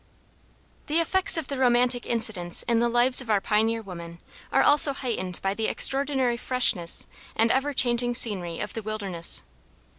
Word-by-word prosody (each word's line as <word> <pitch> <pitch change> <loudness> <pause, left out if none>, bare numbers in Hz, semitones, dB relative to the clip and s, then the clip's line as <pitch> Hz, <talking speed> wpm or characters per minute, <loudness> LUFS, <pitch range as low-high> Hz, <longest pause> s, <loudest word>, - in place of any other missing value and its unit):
The 315 +2 0
effects 365 +2 +2
of 325 - -5
the 275 -2 -6
romantic 245 -1 0
incidents 220 -7 +1
in 235 -1 -1
the 235 0 0
lives 245 +2 +3
of 245 - -13
our 210 -2 +1
pioneer 220 +3 -2
women 170 -3 -11 0.3
are - - +1
also 290 -1 +6
heightened 225 -9 -5
by 195 0 -2
the 220 +2 -4
extraordinary 270 -3 0
freshness 235 -10 +1 0.3
and 225 +1 +1
ever 270 +3 -1
changing 245 -2 0
scenery 185 -9 +1
of 210 - -7
the 225 - -6
wilderness. 200 -6 -2
235 Hz, 160 wpm, -24 LUFS, 205-255 Hz, 0.3 s, also